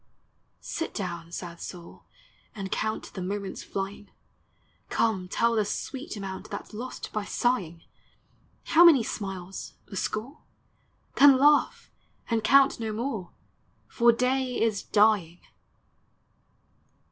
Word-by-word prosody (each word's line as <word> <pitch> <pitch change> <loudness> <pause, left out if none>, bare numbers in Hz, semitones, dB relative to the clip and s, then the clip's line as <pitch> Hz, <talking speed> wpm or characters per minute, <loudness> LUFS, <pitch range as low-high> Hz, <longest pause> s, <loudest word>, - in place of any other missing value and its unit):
Sit 330 - -4
down, 170 -4 -5
sad 170 -1 -7
soul, 175 -2 -10 0.5
and 195 -2 -6
count 215 0 -3
The 190 - -6
moments 195 +1 -4
Hying; 195 +1 -4 0.8
Come, 200 -5 0
tell 230 +5 +1
the 215 - +3
sweet 260 +5 -5
amount 190 -2 -6
That - - -5
's - - -19
lost 245 +4 -7
by 215 - -1
sighing! 190 -8 -1 0.8
How 335 +1 +5
many 310 -9 +7
smiles? 195 -3 -6
— - - -38
a - - -6
score? 230 +9 -3 0.8
Then 275 -1 +8
laugh, 290 +2 +3 0.4
and 225 -1 +1
count 275 +2 +5
no 220 -1 -3
more; 215 -5 -3 0.6
For 235 0 +4
day 250 +1 0
is 220 -3 +1
dying! 205 -5 +2
215 Hz, 125 wpm, -27 LUFS, 190-250 Hz, 0.8 s, Then